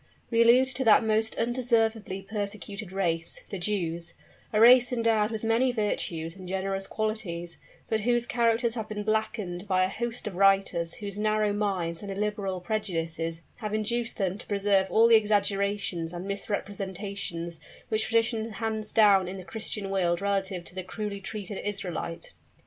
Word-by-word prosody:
We 230 Hz, 0 st, +4 dB
allude 240 Hz, +3 st, +6 dB
to 265 Hz, 0 st, -1 dB
that 220 Hz, -, +6 dB
most 220 Hz, 0 st, +1 dB
undeservedly 225 Hz, -5 st, 0 dB
persecuted 205 Hz, -1 st, -4 dB
race, 170 Hz, -4 st, -1 dB
the 195 Hz, -, -4 dB
Jews 170 Hz, -3 st, -2 dB, 0.4 s
a 215 Hz, -, +1 dB
race 245 Hz, +2 st, +7 dB
endowed 225 Hz, -3 st, +2 dB
with 220 Hz, -1 st, -5 dB
many 230 Hz, +3 st, +3 dB
virtues 170 Hz, -7 st, -2 dB
and 185 Hz, -1 st, -10 dB
generous 195 Hz, 0 st, -2 dB
qualities, 195 Hz, -6 st, -3 dB, 0.3 s
but 220 Hz, -, +1 dB
whose 240 Hz, +2 st, +2 dB
characters 235 Hz, -1 st, +1 dB
have 225 Hz, -3 st, -4 dB
been 210 Hz, -1 st, -4 dB
blackened 210 Hz, -3 st, -2 dB
by 185 Hz, -1 st, +3 dB
a 185 Hz, -, +1 dB
host 235 Hz, +4 st, -4 dB
of 210 Hz, -, -4 dB
writers 195 Hz, -3 st, +3 dB
whose 205 Hz, -1 st, -6 dB
narrow 215 Hz, -1 st, +1 dB
minds 185 Hz, -5 st, -1 dB
and 200 Hz, -1 st, -6 dB
illiberal 200 Hz, -2 st, -2 dB
prejudices 165 Hz, -5 st, -3 dB
have 215 Hz, -3 st, -3 dB
induced 235 Hz, +2 st, -1 dB
them 195 Hz, 0 st, -1 dB
to -, -, -8 dB
preserve 200 Hz, -1 st, +2 dB
all 225 Hz, +5 st, +5 dB
the 230 Hz, -, +5 dB
exaggerations 200 Hz, -4 st, +1 dB
and 175 Hz, +1 st, -5 dB
misrepresentations 195 Hz, -4 st, -4 dB, 0.3 s
which 220 Hz, 0 st, +1 dB
tradition 225 Hz, -1 st, 0 dB
hands 220 Hz, 0 st, -1 dB
down 200 Hz, -4 st, +5 dB
in 190 Hz, +2 st, -5 dB
the 185 Hz, -, -9 dB
Christian 205 Hz, +1 st, -3 dB
world 175 Hz, -3 st, +1 dB
relative 195 Hz, -2 st, -1 dB
to -, -, -12 dB
the 185 Hz, -, -4 dB
cruelly 200 Hz, +1 st, -5 dB
treated 200 Hz, 0 st, -5 dB
Israelite. 180 Hz, -5 st, -3 dB
205 Hz, 160 wpm, -28 LUFS, 190-220 Hz, 0.4 s, race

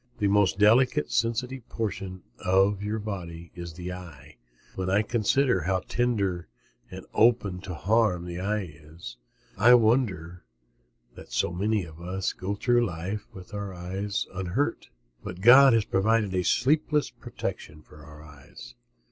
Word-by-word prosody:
The 100 Hz, -, +1 dB
most 100 Hz, -4 st, +2 dB
delicate, 110 Hz, -, +3 dB
sensitive 120 Hz, +2 st, -2 dB
portion 95 Hz, -4 st, -5 dB, 0.2 s
of 95 Hz, +2 st, +2 dB
your 105 Hz, +2 st, -2 dB
body 85 Hz, -6 st, -7 dB
is 85 Hz, -1 st, -8 dB
the 90 Hz, +2 st, -6 dB
eye. 90 Hz, -8 st, -12 dB, 0.4 s
When 95 Hz, 0 st, -3 dB
I 100 Hz, +3 st, +3 dB
consider 120 Hz, 0 st, +1 dB
how 95 Hz, +3 st, 0 dB
tender 100 Hz, -8 st, -1 dB, 0.4 s
and -, -, -9 dB
open 105 Hz, -5 st, +2 dB
to 90 Hz, -2 st, -7 dB
harm 100 Hz, 0 st, +1 dB
the 85 Hz, 0 st, -6 dB
eye 105 Hz, +2 st, -1 dB
is 75 Hz, -5 st, -11 dB, 0.4 s
I 120 Hz, +4 st, +7 dB
wonder 105 Hz, -8 st, +1 dB, 0.7 s
that -, -, -13 dB
so -, -, 0 dB
many 100 Hz, +1 st, 0 dB
of 80 Hz, 0 st, -13 dB
us 95 Hz, +2 st, -3 dB
go 100 Hz, +2 st, -4 dB
through 120 Hz, +3 st, +2 dB
life 95 Hz, +1 st, -4 dB
with 95 Hz, +1 st, -13 dB
our 100 Hz, -2 st, -5 dB
eyes 95 Hz, +3 st, -3 dB
unhurt. 95 Hz, +8 st, -2 dB, 0.3 s
But 90 Hz, +1 st, -7 dB
God 130 Hz, +4 st, +8 dB
has 115 Hz, -2 st, +2 dB
provided 105 Hz, 0 st, +1 dB
a 90 Hz, -, +1 dB
sleepless 150 Hz, -, +1 dB
protection 75 Hz, 0 st, -7 dB
for 75 Hz, 0 st, -16 dB
our 75 Hz, -1 st, -13 dB
eyes. 65 Hz, -5 st, -13 dB
95 Hz, 145 wpm, -26 LUFS, 90-110 Hz, 0.7 s, God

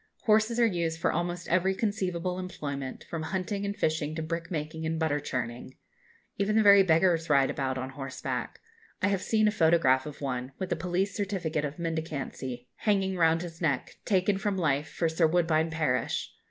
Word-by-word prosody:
Horses 220 Hz, +2 st, +3 dB
are 235 Hz, -, +6 dB
used 170 Hz, -6 st, -1 dB
for -, -, +2 dB
almost 175 Hz, +1 st, -2 dB
every 185 Hz, +2 st, +2 dB
conceivable 185 Hz, -4 st, -1 dB
employment, 140 Hz, -7 st, -5 dB
from 165 Hz, -, -5 dB
hunting 190 Hz, +4 st, -2 dB
and 200 Hz, -, -3 dB
fishing 155 Hz, -1 st, 0 dB
to 160 Hz, -, -3 dB
brick 165 Hz, +1 st, -4 dB
making 160 Hz, -1 st, -4 dB
and 160 Hz, 0 st, -1 dB
butter 160 Hz, -2 st, +1 dB
churning. 125 Hz, -2 st, -4 dB, 0.6 s
Even 205 Hz, +2 st, +1 dB
the 220 Hz, -, +5 dB
very 200 Hz, -1 st, +8 dB
beggars 165 Hz, -2 st, +3 dB
ride 140 Hz, -2 st, +4 dB
about 130 Hz, -1 st, -2 dB
on 130 Hz, +1 st, -4 dB
horseback. 135 Hz, 0 st, -5 dB, 0.4 s
I 200 Hz, -, +4 dB
have 195 Hz, -2 st, 0 dB
seen 215 Hz, -1 st, +2 dB
a -, -, +3 dB
photograph 160 Hz, -8 st, +3 dB
of 150 Hz, -, -8 dB
one, 130 Hz, -1 st, -3 dB
with 190 Hz, -, -4 dB
a -, -, +3 dB
police 185 Hz, +2 st, -1 dB
certificate 175 Hz, -7 st, -1 dB
of 145 Hz, 0 st, -5 dB
mendicancy 150 Hz, -7 st, -4 dB
hanging 195 Hz, -3 st, +1 dB
round 165 Hz, -1 st, +3 dB
his 165 Hz, -1 st, -9 dB
neck, 145 Hz, -6 st, -1 dB
taken 195 Hz, 0 st, +2 dB
from 200 Hz, -1 st, -1 dB
life 145 Hz, -4 st, +1 dB
for 165 Hz, -, 0 dB
Sir 160 Hz, +1 st, +3 dB
Woodbine 165 Hz, -1 st, +2 dB
Parish. 150 Hz, -7 st, -1 dB
165 Hz, 180 wpm, -29 LUFS, 150-190 Hz, 0.6 s, very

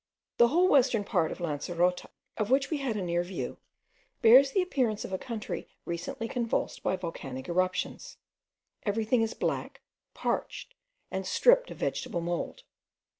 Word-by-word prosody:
The 235 Hz, -, +7 dB
whole 345 Hz, +8 st, +4 dB
western 255 Hz, -, +4 dB
part 180 Hz, -6 st, +1 dB
of -, -, -5 dB
Lancerota, 175 Hz, +2 st, 0 dB, 0.3 s
of 215 Hz, -1 st, -2 dB
which 275 Hz, +3 st, +2 dB
we 310 Hz, -, +1 dB
had 270 Hz, -5 st, -2 dB
a 200 Hz, -, -2 dB
near 175 Hz, 0 st, 0 dB
view, 180 Hz, +2 st, -5 dB, 0.6 s
bears 255 Hz, +5 st, +8 dB
the 370 Hz, +7 st, +2 dB
appearance 250 Hz, -, 0 dB
of -, -, -7 dB
a 190 Hz, -, -1 dB
country 230 Hz, -4 st, -5 dB, 0.2 s
recently 225 Hz, +9 st, -4 dB
convulsed 235 Hz, -1 st, -2 dB
by -, -, +1 dB
volcanic 140 Hz, -7 st, -6 dB
eruptions. 185 Hz, +1 st, -1 dB, 0.6 s
Everything 220 Hz, +3 st, +1 dB
is 225 Hz, 0 st, -1 dB
black, -, -, -3 dB, 0.3 s
parched, -, -, -3 dB, 0.4 s
and 190 Hz, 0 st, -2 dB
stripped -, -, +4 dB
of -, -, -8 dB
vegetable 230 Hz, -9 st, -2 dB
mould. 175 Hz, -, -3 dB
215 Hz, 150 wpm, -29 LUFS, 175-260 Hz, 0.6 s, bears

